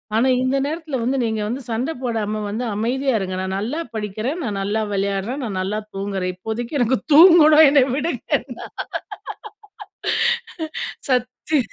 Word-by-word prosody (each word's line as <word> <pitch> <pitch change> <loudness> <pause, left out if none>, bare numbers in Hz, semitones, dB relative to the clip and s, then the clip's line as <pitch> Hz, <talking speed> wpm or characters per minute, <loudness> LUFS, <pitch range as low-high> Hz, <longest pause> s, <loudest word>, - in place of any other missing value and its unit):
ஆனா 235 +4 +3 0.2
இந்த 255 +1 +1
நேரத்துல 310 -1 -4
வந்து 265 +3 0
நீங்க 220 -2 -1
வந்து 245 +5 -3
சண்ட 240 +7 -1
போடாம 215 -4 -2
வந்து 220 +4 -3
அமைதியா 255 +5 0
இருங்க. 185 -1 -3
நான் 190 0 -3
நல்லா 245 +10 -3 0.2
படிக்குறேன். 215 - -3
நான் 205 -6 -2
நல்லா 205 +3 0
விளையாடுறேன். 200 +7 -1
நான் 195 -4 -3
நல்லா 200 +3 -2 0.2
தூங்குறேன். 195 -2 -2
இப்போதைக்கு 230 +8 -4
எனக்கு 245 +2 +2
தூங்கணும் 315 -2 +8
என்ன 280 -1 +5
விடுங்கன்னா." 300 +5 -2 2.4
சத்தி 250 +5 0
235 Hz, 135 wpm, -21 LUFS, 205-275 Hz, 2.4 s, தூங்கணும்